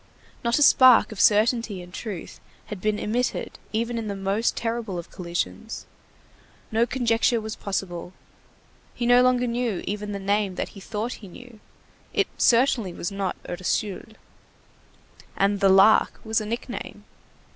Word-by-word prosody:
Not 235 0 +2
a 295 - +4
spark 255 -5 +7
of 215 - -3
certainty 220 -1 +3
and 180 0 -11
truth 200 -6 -7 0.3
had 190 - -8
been 215 +1 0
emitted 240 +5 -2
even 230 +2 -1
in 220 - -5
the 200 - -3
most 195 +4 -1
terrible 225 -5 -3
of 170 - -8
collisions. 170 - -4 0.9
No 230 +2 +2
conjecture 235 -1 +1
was 220 0 -5
possible. 180 -3 -4 0.8
He 240 - -2
no 245 +1 +6
longer 250 0 +3
knew 235 -4 -2
even 205 0 -4
the 200 - -3
name 200 -1 0
that - - -3
he 200 - -12
thought 215 +4 -4
he 200 - -10
knew. 235 +4 -13 0.6
It - - +3
certainly 235 -6 +3
was 175 - -4
not 195 -2 -2
Ursule. 190 +4 -3 1.2
And 200 +1 +2
the 195 - +4
Lark 195 +3 +5
was 220 0 0
a 215 - -5
nickname. 235 +2 -6
215 Hz, 150 wpm, -25 LUFS, 195-235 Hz, 1.2 s, spark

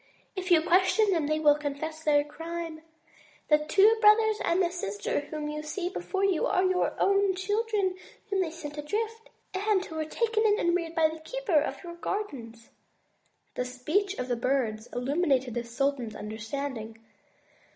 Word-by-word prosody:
If 375 -1 -4
you 330 -3 +5
question 375 +4 +3
them, 325 -5 +1
they 310 +1 +1
will 300 -1 +6
confess 300 +2 -5
their 290 -2 +4
crime. 325 +1 -6 0.7
The 300 -1 +6
two 395 +9 +4
brothers 430 0 +6
and 340 - +2
the 350 -2 +2
sister 205 - -2
whom 295 +1 -5
you 300 0 -4
see 350 +4 -3
before 390 0 -2
you 380 -5 +2
are 370 - +2
your 370 -1 +1
own 395 -1 +3
children, 410 0 0 0.3
whom 395 -2 0
they 350 - 0
sent 305 -2 -8
adrift, 445 +8 -3 0.2
and 385 0 +1
who 320 - -9
were 310 - -1
taken 450 +6 0
in 420 -1 +4
and 345 -3 +2
reared 335 -2 -3
by 325 -2 +5
the 315 +1 -7
keeper 365 -2 0
of 310 - -4
your 345 -1 -7
gardens." 275 - -5 0.8
This 250 0 -4
speech 385 +10 0
of 250 - -3
the 245 - 0
Bird's 235 -3 -1
illumined 275 +2 +1
the 240 - -2
sultan's 240 -1 -2
understanding. 225 +1 -5
320 Hz, 170 wpm, -28 LUFS, 285-385 Hz, 0.8 s, will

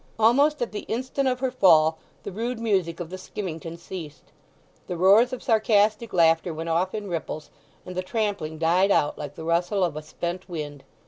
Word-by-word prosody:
Almost 265 +6 +4
at 240 - -4
the 210 - -4
instant 260 +3 -1
of 255 0 0
her 260 -1 0
fall 160 -9 +5 0.2
the - - -5
rude 230 +4 -3
music 190 -7 0
of 175 -1 -6
the 185 - -6
skimmington 170 -4 -6
ceased. 165 -4 -9 0.6
The 180 - -4
roars 205 +8 +5
of 255 - -6
sarcastic 215 -1 +2
laughter 165 -1 +3
went 165 +1 -4
off 175 +4 0
in 210 -1 -4
ripples, 160 -3 -5 0.3
and 180 - -8
the 185 - 0
trampling 200 -6 -2
died 175 +5 +3
out 145 -6 +2
like 145 0 -6
the 160 - -8
rustle 175 +4 +1
of 170 -5 0
a 155 - -4
spent 175 +4 -5
wind. 150 -4 -6
185 Hz, 190 wpm, -25 LUFS, 165-220 Hz, 0.6 s, fall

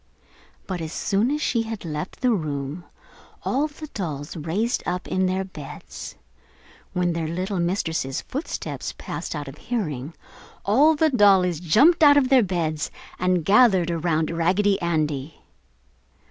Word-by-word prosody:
But 185 -3 -4
as 160 -1 -5
soon 205 +7 +1
as 295 +1 -1
she 235 - +1
had 225 -4 -6
left 155 +2 -5
the 250 - +3
room 150 -2 -3 0.6
all 285 +4 +1
the 310 +1 -10
dolls 155 - -5
raised 175 +9 -1
up 180 0 -2
in 185 0 +1
their 190 +1 0
beds. 150 -6 -9 0.8
When 180 -1 +1
their 165 -1 -2
little 185 +4 -2
mistress' 165 -6 -1
footsteps 285 +6 -5
passed - - -5
out 145 -1 -5
of 135 +2 -10
hearing, 160 - -3 0.5
all 285 +10 +5
the 315 +1 +2
dollies 190 - +4
jumped 265 - +4
out 290 -2 +8
of 265 -3 +3
their 265 -2 +6
beds 165 -6 -1 0.3
and 180 -3 +1
gathered 195 -4 +5
around 165 -1 0
Raggedy 190 +4 +2
Andy. 155 -4 -2
180 Hz, 145 wpm, -24 LUFS, 160-220 Hz, 0.8 s, out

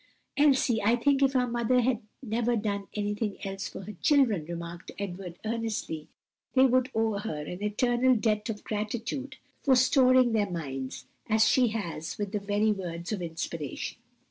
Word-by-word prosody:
'" - - -47
"Elsie, 270 -6 +3
I 225 +4 +4
think 275 +3 +2
if 270 0 +3
our 250 -1 +4
mother 240 +1 +2
had 245 -1 +1 0.2
never 235 +1 0
done 200 -2 -2
anything 210 0 -2
else 195 0 -4
for - - -8
her 210 +2 -8
children," 245 - +3
remarked 170 +1 -7
Edward 180 -3 -6
earnestly, 220 -9 -3 0.5
"they 260 0 +7
would 255 0 +3
owe 220 -2 +1
her 155 -8 -4
an 180 +5 -7
eternal 240 +4 +2
debt 215 -1 0
of 210 -2 -4
gratitude 230 +6 -3 0.2
for 270 -2 +4
storing 255 -1 +5
their 210 -3 +1
minds 135 -7 -5 0.2
as 220 0 +4
she 250 +1 +4
has 175 -8 -4
with 205 -2 -3
the 210 - -1
very 205 +2 +1
words 175 -3 -4
of 205 -4 -2
inspiration." 165 -3 -4
215 Hz, 170 wpm, -28 LUFS, 195-245 Hz, 0.5 s, they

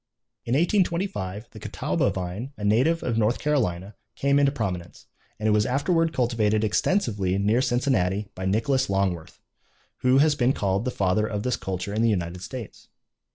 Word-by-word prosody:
In 120 - -1
1825 170 - 0
the - - -11
Catawba - - -1
vine, 95 +9 -5
a - - -7
native 130 +11 +2
of 115 -2 0
North 110 +2 +2
Carolina, 105 -10 -1 0.2
came 140 +1 +2
into 140 -1 +3
prominence; 95 -10 -5 0.3
and 110 - -2
it - - +4
was 105 0 +2
afterward 165 +5 +1
cultivated 115 -5 +1
extensively 105 - +1
near 105 +5 +2
Cincinnati 120 -6 0
by 95 - -6
Nicholas 130 +6 +1
Longworth, 95 -4 -1 0.6
who 130 +1 +3
has 150 +2 +5
been 130 -2 +2
called 100 0 -1
the - - 0
father 105 -1 +1
of 105 -1 -3
this 125 -1 0
culture 95 +1 -4
in 110 - 0
the 115 - +3
United 90 -3 -2
States. 120 +2 -8
110 Hz, 165 wpm, -25 LUFS, 95-135 Hz, 0.6 s, has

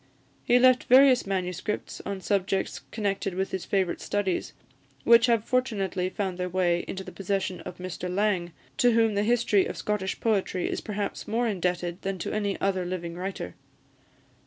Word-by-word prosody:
He 245 - +4
left 255 0 +5
various 255 -2 +6
MSS. 185 +1 -3
on 200 -1 -4
subjects 195 -1 -1
connected 200 -3 -2
with 190 +1 -2
his 190 - -3
favourite 190 -3 0
studies, 200 -3 -1 0.5
which 235 0 +6
have 230 -3 +3
fortunately 195 -8 0
found 190 -2 -3
their 180 0 -1
way 175 -1 +1
into 190 - -5
the - - -9
possession 195 -1 -2
of 180 - -8
Mr 180 0 -5
Laing, 190 -3 0 0.3
to 245 -1 +4
whom 225 -1 +3
the 200 - +1
history 220 -3 +3
of - - -6
Scottish 200 -3 -2
poetry 195 -5 0
is - - -3
perhaps 205 -1 -4
more 230 +3 0
indebted 180 -3 -2
than 195 0 -3
to 170 - -4
any 205 -2 -1
other 190 -2 0
living 175 -1 -4
writer. 185 +2 -5
195 Hz, 165 wpm, -27 LUFS, 185-215 Hz, 0.5 s, various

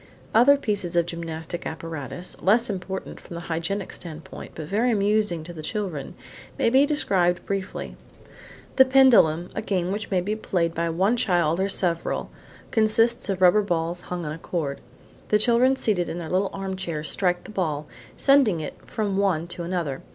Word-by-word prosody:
Other 265 +5 +6
pieces 205 -9 -2
of 170 -1 +3
gymnastic 170 0 -5
apparatus, 160 +1 -6
less 225 +3 +3
important 190 0 -5
from 170 - -10
the 170 - -5
hygienic 170 +4 -3
standpoint, 160 -2 -8
but 155 - -6
very 220 +9 +1
amusing 205 -5 +1
to 175 +2 -9
the 160 - -8
children, 175 -4 -4 0.4
may 230 - +2
be 270 +3 +5
described 190 -12 +1
briefly. 195 -1 -4 0.8
"The 265 - +8
Pendulum," 240 -11 +5
a - - -3
game 185 -4 -1
which 205 +1 -4
may 190 - +2
be 205 +4 -2
played 175 -6 -1
by 170 0 -1
one 190 +8 +2
child 175 -6 +2
or 190 - +2
by - - -2
several, 175 -4 -1 0.4
consists 225 +1 +3
of 190 -1 0
rubber 185 +4 +6
balls 175 -2 -1
hung 175 -2 -5
on 150 - -3
a 155 - -6
cord. 155 -6 -3 0.5
The 210 - +4
children 240 +4 +4
seated 205 -9 0
in 165 - -4
their 165 -2 -6
little 190 +2 +1
armchairs 190 -5 -4
strike 180 -2 0
the - - -10
ball, 155 -7 -2 0.3
sending 275 - +4
it 155 - -5
from 205 -3 -2
one 190 -5 +1
to 175 - -5
another. 170 -6 -3
185 Hz, 175 wpm, -25 LUFS, 170-210 Hz, 0.8 s, The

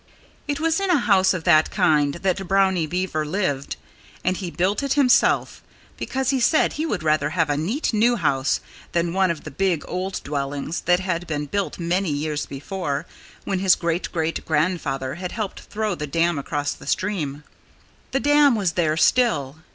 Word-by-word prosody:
It 290 -1 -2
was 325 +2 +1
in 390 -1 -1
a 350 - +5
house 195 -7 +3
of 180 -3 -2
that 155 -3 +4
kind 145 -2 +2
that 190 +1 -1
Brownie 190 -4 +2
Beaver 175 -2 -1
lived. 150 -4 -2 0.5
And 185 +1 +1
he 185 -2 -5
built 185 +4 0
it 275 -1 0
himself, 275 -3 +3 0.3
because 265 0 -1
he 270 - +1
said 310 +6 +3
he 315 +2 -2
would 195 - -2
rather 155 -2 +2
have 165 -3 +2
a - - +1
neat, 210 - -1
new 235 +3 +3
house 140 - 0 0.3
than 170 0 0
one 190 0 +2
of 165 -3 -3
the 155 - -8
big, 175 +1 0
old 185 +1 -3
dwellings 145 +2 -3
that 180 +1 +4
had 175 -2 -2
been 150 -2 -2
built 200 +7 -2
many 180 +2 0
years 150 0 -2
before, 145 +1 -4 0.4
when 190 - -2
his 190 -1 +5
great 170 +1 -2
great 165 -1 -2
grandfather 150 -5 -1
had 180 - -4
helped 215 -4 -4
throw 215 -1 -3
the 150 -3 -5
dam 165 +1 +1
across 145 +1 -2
the - - -14
stream. 150 -8 -2 0.7
The 270 - 0
dam 290 -2 +5
was 195 -5 0
there 160 -3 0
still. 155 - +2
175 Hz, 180 wpm, -23 LUFS, 155-200 Hz, 0.7 s, a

